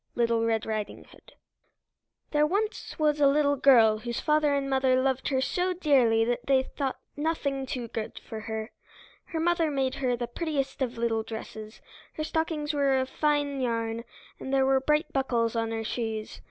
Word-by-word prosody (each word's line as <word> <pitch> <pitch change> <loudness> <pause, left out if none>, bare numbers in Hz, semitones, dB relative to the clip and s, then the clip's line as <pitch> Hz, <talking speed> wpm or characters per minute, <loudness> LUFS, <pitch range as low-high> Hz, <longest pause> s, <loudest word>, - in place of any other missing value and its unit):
'" - - -46
LITTLE 230 -1 +2
RED 225 -1 0
RIDING 215 -1 -4
HOOD - - -18 1.0
There 300 0 +3
was 420 +6 -2
once 300 -1 +2
a 285 - +7
little 285 0 +3
girl 235 -6 +5
whose 235 +1 -4
father 300 -1 +2
and 275 -1 -1
mother 265 -1 +2
loved 265 0 0
her 265 -2 +1
so 365 +6 0
dearly 255 -10 +3
that 240 +1 -2
they 265 -1 +4
thought 270 0 -3 0.2
nothing 285 -3 -1
too 250 -2 -4
good 220 -1 -5
for 220 - -6
her. 220 +1 -5 0.5
Her 325 - -4
mother 335 -1 +2
made 270 -2 0
for - - -7
her 250 -3 0
the 240 - -2
prettiest 275 +1 -3
of 250 -2 -1
little 230 -1 0
dresses; 220 -1 -8 0.3
her 310 - -4
stockings 315 -1 -1
were 280 -2 +2
of 260 0 -1
fine 290 -2 0
yarn, 230 -1 -1 0.4
and 265 - -6
there 270 -1 +3
were 270 0 +4
bright 300 +4 0
buckles 240 -4 0
on 225 -1 0
her 225 0 -3
shoes. 220 -1 -4
265 Hz, 185 wpm, -28 LUFS, 230-295 Hz, 1.0 s, a